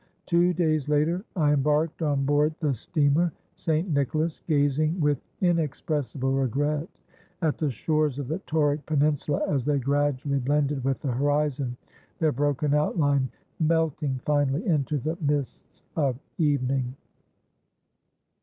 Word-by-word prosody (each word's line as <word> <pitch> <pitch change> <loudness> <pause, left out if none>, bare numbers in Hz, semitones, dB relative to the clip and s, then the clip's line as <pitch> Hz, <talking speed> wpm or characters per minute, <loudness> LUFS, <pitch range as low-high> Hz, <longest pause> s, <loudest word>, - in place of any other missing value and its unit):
Two 175 0 +3
days 155 -4 0
later 155 +5 +1
I 150 -4 +3
embarked 150 +3 +1
on 145 -3 +1
board 145 +2 +2
the 150 -4 +1
steamer 150 - +1 0.2
St. 160 +3 0
Nicholas, 155 +1 0
gazing 155 +2 +2
with 145 -4 +1 0.2
inexpressible 150 -5 0
regret 145 - 0 0.5
at 155 -2 +1
the 155 - +1
shores 150 +2 0
of 140 -3 -4
the 160 +6 -2
Tauric 150 -1 +1
peninsula 150 -1 +1
as 140 -4 0
they 145 +2 +1
gradually 140 0 0
blended 140 0 0
with 135 0 0
the 135 - 0
horizon, 140 -1 0 0.4
their 160 -2 +2
broken 145 +1 0
outline 145 -3 +2 0.3
melting 155 -4 +1
finally 145 - +1
into 150 - +1
the 155 +6 -3
mists 145 -3 -3
of 140 -6 +1 0.2
evening." 135 -4 +1
145 Hz, 125 wpm, -26 LUFS, 140-155 Hz, 0.5 s, Two